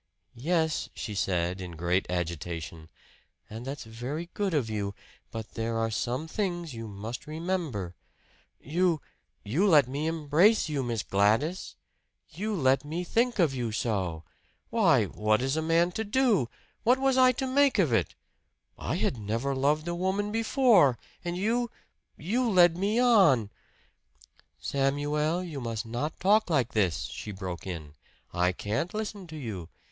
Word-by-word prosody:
"Yes," 160 Hz, +4 st, 0 dB
she 105 Hz, -, -5 dB
said 90 Hz, -1 st, -1 dB
in 90 Hz, -2 st, -7 dB
great 85 Hz, +3 st, 0 dB
agitation 85 Hz, -2 st, -4 dB, 0.6 s
"and 115 Hz, +4 st, -8 dB
that's 140 Hz, -1 st, -5 dB
very 125 Hz, +10 st, -6 dB
good 205 Hz, -2 st, -1 dB
of 135 Hz, -6 st, +1 dB
you. 100 Hz, -2 st, -3 dB, 0.3 s
But 115 Hz, -1 st, -7 dB
there 115 Hz, 0 st, -2 dB
are 115 Hz, 0 st, 0 dB
some 125 Hz, +7 st, -2 dB
things 175 Hz, -4 st, -3 dB
you 115 Hz, -1 st, -6 dB
must 110 Hz, +6 st, -7 dB
remember 155 Hz, -, -3 dB, 0.4 s
" -, -, -35 dB, 0.2 s
"You 175 Hz, -4 st, +3 dB, 0.4 s
you 155 Hz, -, +1 dB
let 150 Hz, -8 st, +6 dB
me 145 Hz, +4 st, -2 dB
embrace 165 Hz, +7 st, +3 dB
you, 150 Hz, -3 st, -1 dB
Miss 120 Hz, -4 st, -2 dB
Gladys! 110 Hz, -, +1 dB, 0.6 s
You 205 Hz, +7 st, -3 dB
let 135 Hz, -4 st, +3 dB
me 160 Hz, +4 st, -3 dB
think 235 Hz, +6 st, +1 dB
of 165 Hz, -8 st, +3 dB
you 120 Hz, -4 st, -2 dB
so! 95 Hz, -8 st, -2 dB, 0.5 s
Why, -, -, +4 dB
what 105 Hz, 0 st, +1 dB
is 135 Hz, +3 st, 0 dB
a 160 Hz, -, 0 dB
man 165 Hz, +2 st, +2 dB
to 220 Hz, -, -2 dB
do? 210 Hz, -, +2 dB, 0.3 s
What 245 Hz, +2 st, +4 dB
was 270 Hz, 0 st, +2 dB
I 255 Hz, -1 st, +6 dB
to 265 Hz, -, -2 dB
make 275 Hz, 0 st, +3 dB
of 165 Hz, -, +3 dB
it? 115 Hz, -, +1 dB, 0.6 s
I -, -, -2 dB
had -, -, 0 dB
never 115 Hz, +7 st, -1 dB
loved 145 Hz, +4 st, +1 dB
a 175 Hz, -, -1 dB
woman 190 Hz, +4 st, -1 dB
before. 225 Hz, -, +4 dB, 0.3 s
And 175 Hz, 0 st, -3 dB
you 235 Hz, +5 st, 0 dB, 0.5 s
you 235 Hz, +9 st, 0 dB
led 175 Hz, -4 st, +6 dB
me 200 Hz, +5 st, 0 dB
on 190 Hz, -, +5 dB, 0.5 s
" -, -, -28 dB, 0.3 s
"Samuel, 145 Hz, +5 st, 0 dB
you 155 Hz, -6 st, -6 dB
must 115 Hz, -1 st, -3 dB
not 120 Hz, +7 st, -4 dB
talk 210 Hz, +2 st, +3 dB
like 135 Hz, -8 st, +1 dB
this!" 95 Hz, -7 st, +1 dB
she 105 Hz, -, -6 dB
broke 95 Hz, -2 st, -6 dB
in. 80 Hz, -5 st, -6 dB, 0.4 s
"I 90 Hz, +1 st, +2 dB
can't 110 Hz, -, -3 dB
listen 210 Hz, -3 st, -4 dB
to 160 Hz, -, -9 dB
you. 100 Hz, -, -6 dB
145 Hz, 160 wpm, -28 LUFS, 110-180 Hz, 0.6 s, let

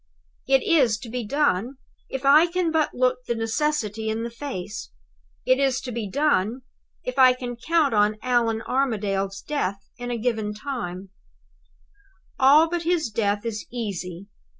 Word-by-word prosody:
"It 270 Hz, -1 st, +4 dB
is 260 Hz, -10 st, +3 dB
to 235 Hz, -, -8 dB
be 245 Hz, +1 st, -3 dB
done, 260 Hz, -1 st, 0 dB, 0.3 s
if 265 Hz, +1 st, -5 dB
I 300 Hz, +5 st, +7 dB
can 345 Hz, -1 st, 0 dB
but 315 Hz, -1 st, +1 dB
look 255 Hz, 0 st, +2 dB
the 235 Hz, -, 0 dB
necessity 225 Hz, -2 st, -1 dB
in 220 Hz, +1 st, -2 dB
the 235 Hz, -, -4 dB
face. 225 Hz, -6 st, -6 dB, 0.6 s
It 255 Hz, +1 st, +3 dB
is 270 Hz, -2 st, +2 dB
to 255 Hz, -, -6 dB
be 225 Hz, -3 st, -4 dB
done, 255 Hz, -2 st, +1 dB, 0.4 s
if 250 Hz, +2 st, -4 dB
I 255 Hz, -1 st, +8 dB
can 245 Hz, -1 st, -6 dB
count 295 Hz, +3 st, +1 dB
on 210 Hz, 0 st, +3 dB
Allan 235 Hz, -3 st, +1 dB
Armadale's 200 Hz, -7 st, -1 dB
death 200 Hz, -10 st, -3 dB
in 245 Hz, 0 st, -5 dB
a 240 Hz, -, -2 dB
given 220 Hz, -3 st, -1 dB
time. 195 Hz, -6 st, -5 dB, 1.3 s
"All 285 Hz, +5 st, +6 dB
but 345 Hz, +1 st, -2 dB
his 330 Hz, -7 st, 0 dB
death 205 Hz, 0 st, 0 dB
is 215 Hz, -2 st, -4 dB
easy. 190 Hz, -6 st, -5 dB
245 Hz, 155 wpm, -24 LUFS, 210-275 Hz, 1.3 s, I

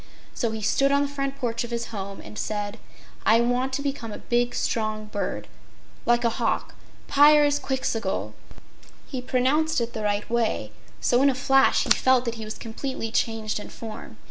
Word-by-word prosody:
So 235 Hz, -, -1 dB
he 220 Hz, -1 st, -5 dB
stood 275 Hz, +6 st, +3 dB
on 280 Hz, 0 st, +3 dB
the -, -, 0 dB
front 275 Hz, -1 st, -3 dB
porch 235 Hz, -4 st, -1 dB
of 240 Hz, -, -6 dB
his 235 Hz, -1 st, -3 dB
home 195 Hz, -1 st, -5 dB
and -, -, -11 dB
said: 210 Hz, 0 st, -3 dB, 0.4 s
"I 225 Hz, +1 st, +5 dB
want 245 Hz, +2 st, +1 dB
to 280 Hz, +1 st, -1 dB
become 275 Hz, -6 st, -3 dB
a -, -, -6 dB
big, 240 Hz, 0 st, 0 dB
strong 215 Hz, -1 st, -1 dB
bird, 210 Hz, -1 st, -4 dB, 0.6 s
like 240 Hz, 0 st, +4 dB
a 235 Hz, -1 st, 0 dB
hawk -, -, 0 dB, 0.3 s
Pyrzqxgl!" 290 Hz, -5 st, +3 dB, 0.7 s
He 260 Hz, -3 st, -5 dB
pronounced 265 Hz, +6 st, +1 dB
it 235 Hz, 0 st, -3 dB
the 220 Hz, -, -4 dB
right 205 Hz, 0 st, 0 dB
way, 230 Hz, -, 0 dB, 0.3 s
so 245 Hz, +1 st, +3 dB
in 280 Hz, -, +6 dB
a 265 Hz, -, 0 dB
flash 270 Hz, +1 st, +4 dB
he -, -, -4 dB
felt 260 Hz, -1 st, +4 dB
that 235 Hz, -, -1 dB
he 225 Hz, -2 st, -7 dB
was 215 Hz, -, -6 dB
completely 225 Hz, 0 st, -5 dB
changed 220 Hz, -2 st, -1 dB
in -, -, -8 dB
form. 215 Hz, -, -9 dB
235 Hz, 180 wpm, -25 LUFS, 220-270 Hz, 0.7 s, in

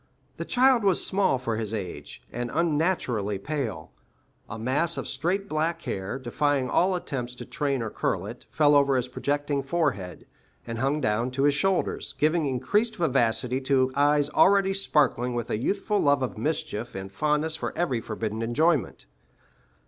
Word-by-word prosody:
The -, -, -4 dB
child 255 Hz, -2 st, +4 dB
was 195 Hz, -3 st, +4 dB
small 190 Hz, -8 st, +2 dB
for 115 Hz, -3 st, -3 dB
his 110 Hz, -1 st, -3 dB
age, 90 Hz, -, -7 dB
and 120 Hz, 0 st, -4 dB
unnaturally 150 Hz, -, 0 dB
pale. 110 Hz, -, -4 dB, 0.6 s
A 110 Hz, -, -6 dB
mass 140 Hz, +9 st, 0 dB
of -, -, -4 dB
straight 195 Hz, +4 st, -1 dB
black 165 Hz, 0 st, -1 dB
hair, 95 Hz, +6 st, -4 dB
defying 135 Hz, +1 st, 0 dB
all 185 Hz, +1 st, +3 dB
attempts 125 Hz, -8 st, -4 dB
to -, -, -8 dB
train 140 Hz, -5 st, -2 dB
or 110 Hz, -, -4 dB
curl -, -, -1 dB
it, -, -, -9 dB
fell 150 Hz, -1 st, +3 dB
over 140 Hz, -1 st, +4 dB
his 125 Hz, -1 st, 0 dB
projecting 145 Hz, +2 st, -1 dB
forehead, 135 Hz, -, -2 dB, 0.4 s
and 115 Hz, -1 st, -5 dB
hung 140 Hz, +4 st, 0 dB
down 115 Hz, +2 st, 0 dB
to 135 Hz, +2 st, -2 dB
his 145 Hz, 0 st, +4 dB
shoulders, 190 Hz, +5 st, 0 dB
giving 155 Hz, 0 st, +2 dB
increased 205 Hz, -, 0 dB
vivacity 130 Hz, -4 st, 0 dB
to 130 Hz, -1 st, +2 dB
eyes 145 Hz, 0 st, +3 dB
already 195 Hz, +3 st, +4 dB
sparkling 145 Hz, -10 st, +2 dB
with 120 Hz, -2 st, -3 dB
a 105 Hz, -, 0 dB
youthful 205 Hz, +6 st, 0 dB
love 145 Hz, -2 st, +3 dB
of 130 Hz, -, -3 dB
mischief 150 Hz, -3 st, -3 dB
and 95 Hz, 0 st, -6 dB
fondness 150 Hz, +8 st, 0 dB
for -, -, -4 dB
every 135 Hz, -10 st, 0 dB
forbidden 110 Hz, 0 st, -4 dB
enjoyment. 140 Hz, -, +1 dB
140 Hz, 165 wpm, -26 LUFS, 120-160 Hz, 0.6 s, child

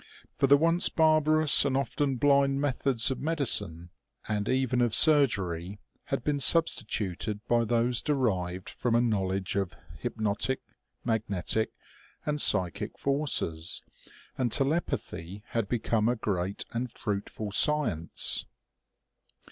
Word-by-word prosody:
For 135 Hz, -, +1 dB
the 140 Hz, +1 st, +6 dB
once 165 Hz, +4 st, +3 dB
barbarous 155 Hz, -1 st, +5 dB
and 135 Hz, -2 st, 0 dB
often 135 Hz, +1 st, -1 dB
blind 140 Hz, +1 st, +2 dB
methods 135 Hz, -3 st, 0 dB
of 130 Hz, -, -4 dB
medicine, 120 Hz, -, 0 dB, 0.4 s
and 105 Hz, -1 st, -2 dB
even 130 Hz, -1 st, 0 dB
of 120 Hz, -3 st, +1 dB
surgery, 100 Hz, -, +3 dB, 0.3 s
had 135 Hz, -, -3 dB
been 145 Hz, -1 st, -1 dB
substituted 105 Hz, -, +1 dB
by 120 Hz, -1 st, +2 dB
those 120 Hz, +2 st, +1 dB
derived 95 Hz, -11 st, -2 dB
from 120 Hz, -2 st, -2 dB
a -, -, +4 dB
knowledge 95 Hz, -4 st, -1 dB
of 100 Hz, -3 st, -2 dB, 0.2 s
hypnotic, 110 Hz, +5 st, -2 dB, 0.5 s
magnetic 110 Hz, -1 st, -1 dB, 0.6 s
and 150 Hz, -1 st, -1 dB
psychic 90 Hz, -5 st, +1 dB
forces, 135 Hz, -, -1 dB, 0.6 s
and 125 Hz, -3 st, 0 dB
telepathy 105 Hz, -, -2 dB
had 115 Hz, -4 st, -2 dB
become 115 Hz, -1 st, 0 dB
a 120 Hz, -, +1 dB
great 100 Hz, -3 st, -3 dB
and 120 Hz, +1 st, -4 dB
fruitful 105 Hz, 0 st, -5 dB
science. 110 Hz, -, +2 dB
120 Hz, 115 wpm, -28 LUFS, 100-140 Hz, 0.6 s, the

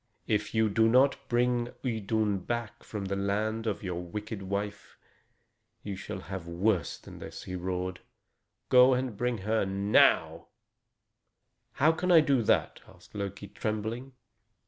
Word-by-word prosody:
"If 105 Hz, +1 st, -1 dB
you 110 Hz, 0 st, +4 dB
do 110 Hz, +2 st, +3 dB
not 130 Hz, +4 st, +5 dB
bring 120 Hz, 0 st, +1 dB
Idun 110 Hz, -3 st, 0 dB
back 120 Hz, +3 st, -4 dB
from 105 Hz, -2 st, -5 dB
the 100 Hz, 0 st, -2 dB
land 105 Hz, +3 st, -1 dB
of 105 Hz, -, -2 dB
your 90 Hz, -2 st, -3 dB
wicked 105 Hz, +4 st, -6 dB
wife, 100 Hz, +2 st, -4 dB, 0.9 s
you 100 Hz, -2 st, -4 dB
shall 95 Hz, 0 st, -6 dB
have 95 Hz, -2 st, -7 dB
worse 85 Hz, -1 st, 0 dB
than -, -, -12 dB
this!" -, -, -8 dB
he 90 Hz, -, -6 dB
roared. 90 Hz, 0 st, -3 dB, 0.7 s
"Go 125 Hz, 0 st, +7 dB
and 125 Hz, -3 st, -2 dB
bring 120 Hz, +2 st, -1 dB
her 110 Hz, +1 st, +2 dB
now." 100 Hz, +2 st, +3 dB, 1.3 s
"How 155 Hz, +4 st, +4 dB
can 180 Hz, +3 st, -1 dB
I 170 Hz, -, +9 dB
do 140 Hz, -4 st, +2 dB
that?" 110 Hz, -, +1 dB
asked 90 Hz, -1 st, -18 dB
Loki, 100 Hz, 0 st, -5 dB
trembling. 110 Hz, +6 st, -4 dB
105 Hz, 145 wpm, -29 LUFS, 95-120 Hz, 1.3 s, I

